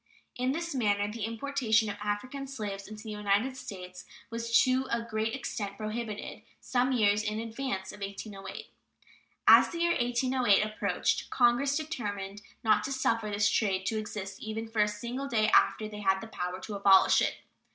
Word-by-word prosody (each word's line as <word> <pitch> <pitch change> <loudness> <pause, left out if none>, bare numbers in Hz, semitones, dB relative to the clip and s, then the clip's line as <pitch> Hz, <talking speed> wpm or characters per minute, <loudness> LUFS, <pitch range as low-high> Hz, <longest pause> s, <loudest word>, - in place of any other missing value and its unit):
In 250 +1 0
this 335 +3 -3
manner 205 -5 +1
the 220 -1 -4
importation 230 -2 +1
of 205 - -3
African 255 +7 -3
slaves 205 -7 -5
into 215 +1 -9
the 220 - -6
United 210 +5 0
States 185 -7 -8 0.3
was 230 0 -4
to 260 +1 +1
a 235 0 0
great 225 0 -2
extent 205 -6 -4
prohibited 215 0 -5 0.2
some 255 +1 +1
years 210 -4 +3
in 210 0 -2
advance 225 -4 -4
of - - -12
1808. 195 0 -7 0.8
As - - +8
the 340 - -6
year 340 0 +3
1808 245 -5 +2
approached 215 0 -1
Congress 255 +3 +3
determined 205 -10 -4 0.2
not 220 -2 +4
to 275 - -3
suffer 230 -5 0
this 205 0 +2
trade 195 -2 +1
to 220 +2 0
exist 195 -2 -6
even 220 +1 -4
for 225 -1 0
a 210 - +4
single 235 +6 -4
day 220 -4 +2
after 215 0 +4
they 210 -1 -8
had 190 -1 +2
the 225 - -7
power 180 -3 -4
to 215 - -6
abolish 195 -1 +5
it. - - +1
220 Hz, 170 wpm, -30 LUFS, 205-245 Hz, 0.8 s, As